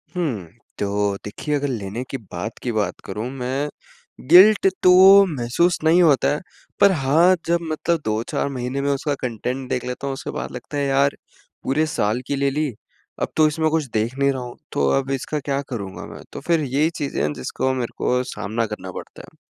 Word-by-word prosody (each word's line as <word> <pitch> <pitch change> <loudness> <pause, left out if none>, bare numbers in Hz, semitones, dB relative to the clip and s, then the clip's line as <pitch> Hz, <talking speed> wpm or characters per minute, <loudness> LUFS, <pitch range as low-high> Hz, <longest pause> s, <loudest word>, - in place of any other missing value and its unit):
हुँ, 130 - -2 0.3
तो 100 0 0
देखिए 145 +8 -3
अगर 145 0 -1
लेने 115 -2 -4
के 135 - -3
बाद 100 -2 -6
की 125 - -1
बात 110 -2 -1
करूँ 105 +5 -4
मैं 135 +2 -2 0.6
गिल्ट 195 +4 +8 0.2
तो 180 - +7 0.4
महसूस 135 +8 +1
नहीं 165 +3 +5
होता 145 -5 +4
है। - - -5 0.4
पर 200 - +7
हाँ 165 +4 +4
जब 170 +1 +2
मतलब 165 +2 0
2-4 110 +5 -1
महीने 130 0 -3
में 140 - 0
उसका 140 +1 -1
कंटेंट 125 +2 -3
देख 125 - -2
लेता 125 +2 -4
हूँ 135 - -2
उसके 135 - -6
बाद - - -5
लगता 125 +4 -7
है 140 - 0
यार 140 +1 +2 0.5
पूरे 145 +4 +1
साल 125 -6 -1
की 140 - -1
ले 140 0 +1
ली, 150 +2 -1 0.5
अब - - -1
तो 155 -1 +6
इसमें 155 +1 0
कुछ 160 -1 +1
देख 110 +4 0
नहीं 140 0 +3
रहा 130 -2 -4
हूँ। 120 -1 -8
तो 70 -1 +1
अब 135 0 -4
इसका 135 +3 -2
क्या 140 0 -2
करूँगा 100 -7 -6
मैं, - - -10
तो - - -7
फ़िर 170 -2 +1
यही 145 +3 +1
चीजें 140 - -3
हैं 75 0 0
जिसको 75 - -2
मेरे 125 -3 -3
को 125 0 +1
सामना 115 -2 -3
करना 105 -3 -7
पड़ता - - -9
है। - - -17
135 Hz, 200 wpm, -22 LUFS, 115-150 Hz, 0.6 s, गिल्ट